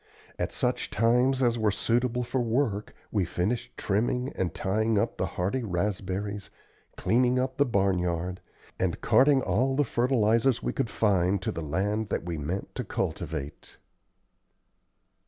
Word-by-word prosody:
At - - -1
such - - -1
times 125 +3 +3
as 120 -1 +2
were 110 -1 +3
suitable 120 +4 0
for 125 +2 -1
work 115 -3 -1 0.2
we 100 -3 +2
finished 90 +7 -2
trimming 120 +6 0
and 90 -3 -1
tying 110 +5 0
up 100 - 0
the - - 0
hardy 95 +9 0
raspberries, 100 0 -2 0.5
cleaning 125 +2 +2
up 130 0 -1
the 145 0 +3
barnyard, 90 -4 0 0.4
and - - 0
carting 135 0 +4
all 125 +9 +1
the 145 - +3
fertilizers 120 -1 +2
we - - -1
could 115 - -1
find 100 -3 +2
to - - -1
the 85 - -5
land 100 +8 -1
that - - -1
we 85 -2 -4
meant 85 +7 -4
to - - -3
cultivate. 75 -2 -4
110 Hz, 145 wpm, -28 LUFS, 95-125 Hz, 0.5 s, carting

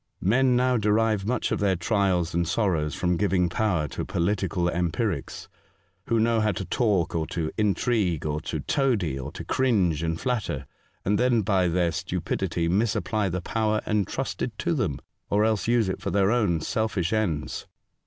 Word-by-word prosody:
Men 125 +6 +3
now 125 0 +3
derive 105 -1 +2
mucli 120 +2 -1
of - - 0
their 100 -2 +2
trials 90 -2 +1
and 85 0 0
sorrows 85 -7 0
from 90 -1 0
giving 95 -3 +2
power 85 -5 0
to - - -4
political 90 -1 0
empirics, 85 -1 -2 0.6
who 115 - +2
know 115 0 +2
how 110 0 +2
to - - -4
talk 105 -9 +1
or 80 -2 -1
to 80 -2 -3
intrigue, 100 -5 +1
or 75 0 -1
to - - -4
toady, 105 - 0
or 65 - -6
to - - -7
cringe 95 - +1
and 80 0 -2
flatter, 110 - -2 0.4
and 100 +2 +2
then 125 -3 +3
by 95 -2 +2
their 85 0 +1
stupidity 90 -1 -2
misapply 100 +1 0
the 90 +1 -3
power 110 +2 0
entrusted 105 -3 -2
to - - 0
them, - - -1 0.3
or 105 +1 +3
else 110 -2 0
use 115 -3 +3
it 95 - -3
for - - -2
their 100 0 +2
own 100 -9 +1
selfish 105 -2 -1
ends. 90 -9 -1
95 Hz, 170 wpm, -26 LUFS, 85-110 Hz, 0.6 s, Men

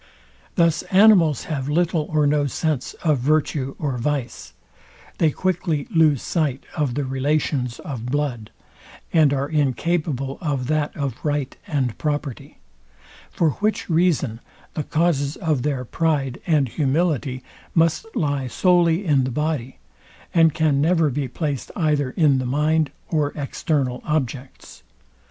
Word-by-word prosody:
Thus 165 -2 +3
animals 185 - +5
have 140 -3 -3
little 165 0 +1
or 155 -1 +2
no 145 0 +2
sense 145 -1 -2
of 155 -5 +2
virtue 140 0 0
or 135 -5 -2
vice; 130 -3 -3 0.7
they 160 - +4
quickly 170 -3 -1
lose 155 -5 +3
sight 150 -6 -1
of 140 -5 -1
the 145 - -1
relations 130 -2 -1
of 125 -5 -6
blood; 125 -5 -2 0.6
and 155 -4 +5
are 140 0 0
incapable 145 -1 -1
of 140 -6 -1
that 150 +1 -1
of 140 -5 -4
right 145 -3 -1
and 130 -7 -1
property: 145 -4 -3 0.7
For 160 -3 +1
which 210 -3 -1
reason 160 -9 +1 0.3
the - - -2
causes 150 -3 +1
of 155 -8 -1
their 135 -2 -2
pride 140 -3 -1
and 150 -5 +3
humility 140 -1 0 0.3
must 165 +5 +2
lie 145 -4 0
solely 175 - +2
in 145 -5 +3
the 130 - -1
body, 150 -2 -2 0.6
and 165 -2 +5
can 150 -3 +1
never 165 -1 +3
be 140 +1 -2
placed 140 -1 -3
either 150 -5 +1
in 140 -1 +3
the 130 - -2
mind 150 +3 +1 0.2
or 150 -3 0
external 140 -3 -1
objects. 135 -3 -4
145 Hz, 135 wpm, -22 LUFS, 135-160 Hz, 0.7 s, animals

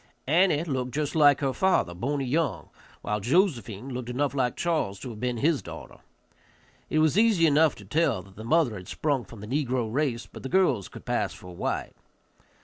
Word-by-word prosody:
Annie 165 +1 +3
looked 130 -6 -3
just 150 -1 -1
like 145 -3 +5
her 135 -2 0
father, 190 - +2
Boney 135 +9 -2
Young, 130 - -1 0.3
while 105 0 -1
Josephine 125 - 0
looked 125 -1 -5
enough 140 +3 -1
like 125 -3 0
Charles 155 - -1
to 125 - -6
have 105 - -9
been 125 0 -1
his 150 +4 +2
daughter. - - -10 0.9
It - - 0
was 155 +5 +4
easy 215 -7 +4
enough 155 0 +4
to 105 - -13
tell 135 - +1
that 95 -1 -18
the 110 - -9
mother 150 0 +2
had 90 0 -10
sprung 140 -6 -1
from 100 +2 -12
the 105 - -8 0.2
negro 120 -3 -2
race, 125 -5 0
but 100 - -12
the 135 - -5
girls 185 - +2
could - - -12
pass - - -1
for 90 -1 -11
white. - - -3
135 Hz, 195 wpm, -27 LUFS, 115-155 Hz, 0.9 s, like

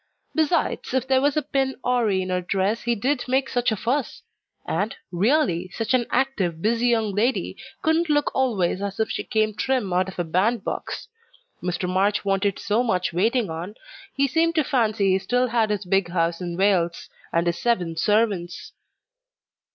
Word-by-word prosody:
Besides, 315 -4 0
if 260 0 0
there 265 -1 +3
was 285 +1 +1
a 305 - +1
pin 270 -1 -1
awry 245 -4 +2
in 185 - -4
her 180 0 0
dress 195 +4 0
he 235 0 0
did 250 +4 0
make 265 +2 +1
such 245 -1 0
a - - +1
fuss 245 +6 -2 0.4
and, 210 +3 -1 0.2
really, 185 - +1
such 225 +6 -2
an 245 -2 +2
active, 210 -11 0
busy 230 +5 +1
young 225 -4 +1
lady 230 +6 0 0.3
couldn't 320 +1 +2
look 295 -1 +2
always 200 -8 0
as 200 0 -4
if 220 - 0
she - - -3
came 215 -1 0
trim 215 -3 -1
out 185 +1 +1
of 190 - -11
a 175 - 0
band 195 +7 +1
box. - - -5 0.5
Mr. 180 0 -2
March 195 +3 +1
wanted 195 0 +1
so 210 +3 0
much 185 -8 0
waiting 220 +2 +1
on, 175 +6 -6 0.4
he 275 0 +2
seemed 330 +4 +1
to 310 - +3
fancy 220 -7 +1
he 190 - +3
still 250 +5 0
had 225 -2 +1
his 210 -2 -2
big 195 -1 +1
house 170 0 0
in 175 -1 -4
Wales, 185 -4 +1 0.2
and 170 +1 +1
his 170 0 -1
seven 180 -9 0
servants." 200 -1 0
215 Hz, 180 wpm, -24 LUFS, 185-250 Hz, 0.5 s, there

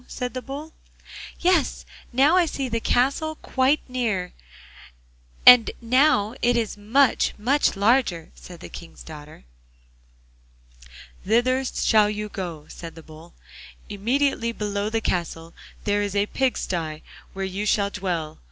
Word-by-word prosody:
said 250 -1 -5
the 255 - -4
Bull. 290 +5 -8 0.7
'Yes, 350 -6 +1 0.3
now 275 +7 +4
I 360 -2 +4
see 275 -3 -3
the 230 -1 -2
castle 280 +7 0
quite 270 +1 +1
near, 225 -8 -2 1.1
and 250 -2 +9
now 235 -3 +2
it 240 0 +2
is 225 -3 -2
much, 230 +6 +2
much 260 +6 +1
larger,' 200 -5 +1
said 175 -2 -13
the - - -8
King's 170 - -11
daughter. 150 - -12 1.8
'Thither 245 +5 +2
shall 215 -4 +2
you 210 0 -4
go,' 170 -7 -6
said 165 -1 -10
the 165 - -12
Bull; 160 +2 -15 0.5
'immediately 235 +3 0
below 205 -2 -3
the 225 0 -1
castle 165 -3 -3 0.3
there 205 0 +1
is 205 -1 -3
a 200 0 +2
pig 265 +4 -1
sty, 160 -4 -4 0.3
where 195 0 -3
you 195 +3 -4
shall 200 -1 +1
dwell. 175 -6 -4
215 Hz, 135 wpm, -24 LUFS, 185-255 Hz, 1.8 s, and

